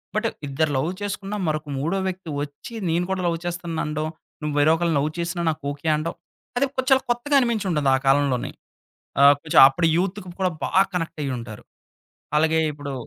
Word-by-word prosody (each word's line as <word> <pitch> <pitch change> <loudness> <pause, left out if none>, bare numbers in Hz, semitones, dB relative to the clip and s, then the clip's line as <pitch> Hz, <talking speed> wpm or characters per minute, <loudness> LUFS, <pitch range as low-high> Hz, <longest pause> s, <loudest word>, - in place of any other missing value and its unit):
But - - +1 0.2
ఇద్దరు 150 +2 0
love 155 +6 0
చేసుకున్న 205 0 -4
మరొక 155 0 -2
మూడో 170 +7 -1
వ్యక్తి 185 -3 -5
వచ్చి 145 +11 -8 0.2
నేను 175 +2 +1
కూడా 190 -1 -1
లవ్ 165 -1 0
చేస్తున్నాండం, 165 -3 -3 0.4
నువ్వు 150 -1 -2
వేరే 155 +2 +5
ఒకకళ్ళని 165 -2 0
లవ్ 150 +2 0
చేసినా 170 0 -2
నాకోకే 145 0 -4
అండం. 155 +2 -3 0.4
అది 275 - +3
కొంచల్ 265 +1 +3
కొత్తగా 240 +4 +1
అనిపించి 235 -5 0
ఉంటుంది 150 -4 +1
ఆ - - +2
కాలంలోని. 135 -2 +2 0.7
ఆహ్, 140 +1 +9
కొంచెం 155 - +5
అప్పుడు 165 +5 0
యూత్‌కి 185 +1 -2
కూడా 185 -1 +2
బాగా 190 +1 +4
కనెక్ట్ 165 -2 -3
అయ్యుంటారు. 120 -5 -5 0.7
అలాగే 160 +1 +3
ఇప్పుడు 145 -1 -7
160 Hz, 165 wpm, -23 LUFS, 145-185 Hz, 0.7 s, ఆహ్